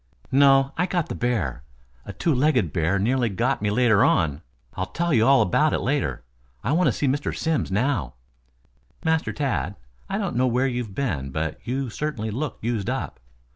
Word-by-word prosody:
"No, 135 0 +5
I 180 - +2
got 175 -2 -1
the - - -3
bear. 100 - -1 0.5
A - - -4
two 160 - 0
legged 130 - +2
bear 85 +3 +1
nearly 120 +4 +1
got 95 0 0
me 105 - +1
later 110 -1 +4
on. 75 -2 +2 0.3
I'll 95 - -3
tell 170 - -1
you 115 -1 +4
all 135 -4 +6
about 150 - +2
it - - +1
later. 90 - -1 0.4
I - - 0
want 175 +4 +3
to - - +4
see - - -2
Mr. 140 +2 -1
Simms 160 -10 -1
now." 105 - 0 0.9
"Master 160 0 +1
Tad, 110 - -2 0.3
I - - -1
don't - - -2
know 130 +1 +2
where 125 +2 +1
you 125 -2 -1
have 105 -5 -8
been, 85 - -2
but 75 +2 -3
you 130 0 -2
certainly 120 -8 -3
look 135 +5 -3
used 115 -4 -1
up. - - -4
125 Hz, 190 wpm, -24 LUFS, 95-140 Hz, 0.9 s, all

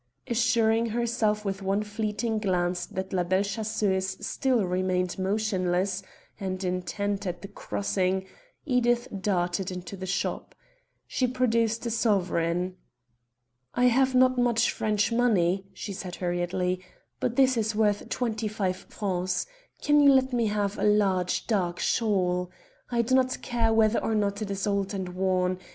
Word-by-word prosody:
Assuring 230 -1 +2
herself 225 -2 0
with 195 0 -2
one 195 +2 0
fleeting 215 +1 -2
glance 180 -3 0
that 190 +1 -5
La 180 -1 +2
Belle 185 +3 +1
Chasseuse 200 -3 -1
still 255 -6 0
remained 180 0 -1
motionless 190 -2 0 0.4
and 190 -1 -3
intent 195 +2 -2
at 175 +1 -4
the - - -5
crossing, 190 -2 -1 0.4
Edith 240 -3 +2
darted 185 -1 0
into 180 +1 -6
the 190 0 -6
shop. 195 - -3 0.5
She 255 - 0
produced 230 -2 +1
a 235 - -1
sovereign. 180 -5 0 1.0
"I 245 - +3
have 260 +1 +3
not 255 0 +4
much 240 -2 +3
French 210 0 0
money," 195 -6 +2
she 205 - -6
said 180 -2 -6
hurriedly, 180 +1 -1 0.4
"but 240 - -1
this 260 -1 +4
is 220 -1 0
worth 210 -1 +1
twenty 225 -3 -1
five 195 -3 -1
francs. 185 -2 -2 0.4
Can 295 0 +4
you 285 -1 +7
let 260 -1 +3
me 235 -2 +2
have 205 -1 -1
a - - -1
large 195 -4 +2
dark 180 -6 0
shawl? 180 -5 +1 0.4
I 235 -1 +1
do 245 +3 -1
not 260 0 +2
care 230 -2 +1
whether 220 0 +3
or 225 - 0
not 205 0 0
it 210 - -3
is 195 -1 -2
old 200 -1 -1
or 185 -2 -4
worn. 185 0 0
205 Hz, 150 wpm, -27 LUFS, 185-230 Hz, 1.0 s, you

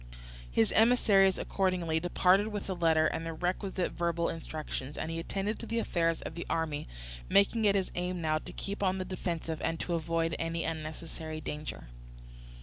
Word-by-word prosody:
His 110 - +2
emissaries, 205 -4 +5
accordingly, 180 -4 0
departed 180 +4 +3
with 210 -2 -4
the 190 - -2
letter 165 -3 +3
and 165 - 0
the 165 0 -3
requisite 185 +2 -1
verbal 170 -1 0
instructions; 155 -4 -5
and 160 - -3
he 165 - -2
attended 195 +5 -2
to 230 - -7
the 230 - -2
affairs 165 -7 +1
of - - -5
the 170 - -6
army, 160 -3 -1 0.4
making 215 +3 +4
it 200 -1 +5
his 190 -2 0
aim 180 0 -2
now 155 -1 +1
to - - -9
keep 200 +1 -5
on 190 -1 +2
the 185 - -2
defensive 170 -3 -3
and 165 - -1
to 175 - -2
avoid 165 0 0
any 165 0 -1
unnecessary 160 0 -5
danger. 150 - -6
170 Hz, 175 wpm, -31 LUFS, 160-190 Hz, 0.4 s, emissaries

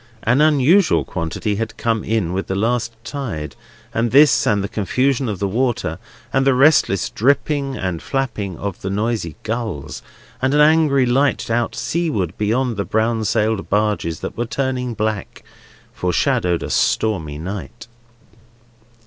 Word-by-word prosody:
An 125 +6 +3
unusual 155 +5 +4
quantity 90 +5 -3
had 110 0 -4
come 115 -2 0
in 105 -6 -1
with 95 +1 -2
the 95 - -2
last 115 +2 0
tide, 80 - -5 0.4
and 115 +1 +1
this, 140 +2 +5
and 100 -2 +2
the - - -2
confusion 130 +6 0
of 105 - -3
the 100 - -1
water, 110 -6 -1 0.3
and 135 - +3
the 135 -1 +3
restless 135 -8 +3
dipping 140 +2 +1
and 90 -3 -3
flapping 115 - -3
of 100 -3 -5
the 95 - -3
noisy 105 -5 -2
gulls, 105 - -4 0.4
and 130 +2 +1
an - - +4
angry 150 -3 +4
light 130 0 +1
out 120 0 0
seaward 115 - -1
beyond 115 +2 0
the 100 - 0
brown 110 +2 0
sailed 110 -2 0
barges 105 -6 0
that - - -5
were 120 - -2
turning 125 0 -2
black, 110 -2 -3 0.5
foreshadowed 90 -1 0
a - - -4
stormy 80 -10 0
night. 100 +7 -7
115 Hz, 150 wpm, -20 LUFS, 100-130 Hz, 0.5 s, this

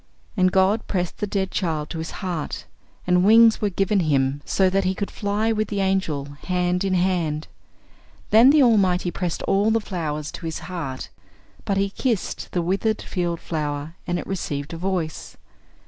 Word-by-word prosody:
And 185 -2 +3
God 190 +4 +2
pressed 180 -3 -2
the 210 - -1
dead 195 -1 -1
child 155 -4 -2
to 165 - -4
His 160 - -4 0.2
heart, 170 -5 -3 0.4
and 180 0 +3
wings 225 +2 +6
were 210 - +2
given 195 +2 +1
him 140 -4 +1
so 190 - +2
that 195 +1 +1
he 190 0 0
could 200 - -3
fly 210 +2 0
with 215 -1 0
the 200 -1 -3
angel, 190 -7 0 0.2
hand 180 0 0
in 190 -1 +1
hand. 175 -4 0 0.8
Then 230 +4 +8
the 295 0 +6
Almighty 190 -7 +3
pressed 175 -2 -3
all 200 +3 +2
the 225 +1 +3
flowers 155 -7 -4
to 165 - -6
His 160 - -3
heart; 160 -8 -5 0.6
but 195 - 0
He 195 0 +1
kissed 230 -3 -2
the 175 - 0
withered 200 +5 0
field 175 -2 -2
flower, 150 -1 -3
and 175 0 0
it - - -5
received 150 -5 -4
a - - -5
voice. 180 -3 -3
185 Hz, 180 wpm, -23 LUFS, 165-200 Hz, 0.8 s, Then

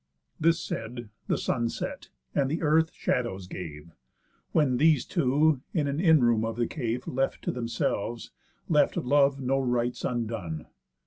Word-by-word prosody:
This 165 +2 +3
said, 120 -9 -5 0.2
the - - +1
sun 115 0 0
set, - - -5 0.2
and 135 0 +1
earth 160 +1 +3
shadows 110 -7 -2
gave; 85 -3 -8 0.6
When 140 -6 +3
these 155 -1 +4
two 150 -2 +2
(in 150 -4 +1
an 140 +2 -1
in 160 -5 +5
room 115 -2 +3
of 115 0 -2
the 120 0 +1
cave, 125 -2 -3
Left 135 +1 -1
to - - 0
themselves) 115 -1 -2 0.4
left - - +3
love 140 +1 +3
no 135 +1 +1
rites 125 -2 -1
undone. 110 -10 -3
125 Hz, 145 wpm, -28 LUFS, 115-145 Hz, 0.6 s, in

